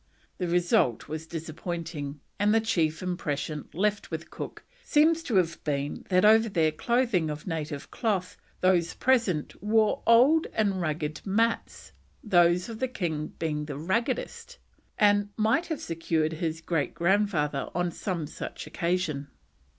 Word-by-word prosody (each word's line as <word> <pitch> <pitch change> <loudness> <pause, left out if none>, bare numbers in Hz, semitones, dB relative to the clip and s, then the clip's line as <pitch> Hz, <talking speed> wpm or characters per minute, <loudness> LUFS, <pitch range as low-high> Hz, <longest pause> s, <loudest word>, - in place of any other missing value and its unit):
The 180 - -1
result 170 -9 +2
was 155 +2 -5
disappointing, 160 -3 -5 0.2
and 210 +2 +3
the - - +5
chief 170 -8 0
impression 155 -4 -3
left 205 +4 0
with - - -6
Cook - - -7 0.2
seems 320 +2 +3
to 255 -10 -3
have 170 -3 +1
been 145 -1 -3
that 185 +1 +4
over 220 +1 +6
their 160 -5 +2
clothing 230 -2 +1
of 150 0 -6
native 155 -4 -4
cloth, 195 -6 -1 0.3
those 180 -3 +2
present 230 - +1
wore 215 +1 +2
old 265 +8 +6
and 200 -4 +1
ragged 155 -1 -2
mats; 225 +4 -1 0.3
those 175 -3 +4
of 225 -2 -7
the 260 - 0
king 160 -10 -3
being 150 -2 -2
the 145 -2 -6
raggedest, 190 +10 -2 0.4
and 205 -1 +4
"might 225 +10 +2
have 320 -4 -3
served 165 -1 -1
his 160 -1 -3
great 165 -3 -1
grandfather 170 -6 +1
on 175 0 0
some 175 -3 -3
such 150 - -7
like - - -13
occasion." 170 -5 -1
175 Hz, 145 wpm, -28 LUFS, 155-210 Hz, 0.4 s, over